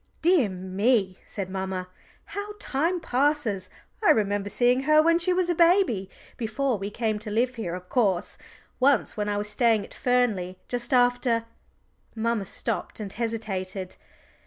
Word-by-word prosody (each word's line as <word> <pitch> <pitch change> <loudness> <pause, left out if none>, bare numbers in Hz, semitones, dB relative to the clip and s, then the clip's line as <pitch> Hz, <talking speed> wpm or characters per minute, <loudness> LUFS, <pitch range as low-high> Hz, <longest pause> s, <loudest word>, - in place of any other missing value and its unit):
"Dear 330 - +4
me," 190 +2 0
said 195 -3 -5
mamma, 190 -1 -4 0.4
"how 405 +1 -6
time 335 +1 0
passes! 255 - 0 0.3
I 420 - +4
remember 205 -1 +2
seeing 245 +3 +3
her 305 0 +7
when 335 +2 +4
she 350 +2 +1
was 360 -1 +1
a 350 - +2
baby 335 - +3 0.3
before 235 +1 -1
we 200 +1 -3
came 215 0 -1
to 215 - -7
live 240 +4 +1
here, 215 -8 -4
of 180 0 -9
course, 195 -8 +1 0.4
once 270 -2 +3
when 210 -1 -2
I 205 - 0
was 205 0 -1
staying 220 -1 +2
at - - -14
Fernley, 220 -8 0
just 245 +1 -3
after 245 -2 +3 0.4
" - - -39
Mamma 225 -2 0
stopped - - -3
and 205 -2 -5
hesitated. 195 -5 -3
230 Hz, 160 wpm, -26 LUFS, 195-260 Hz, 0.4 s, her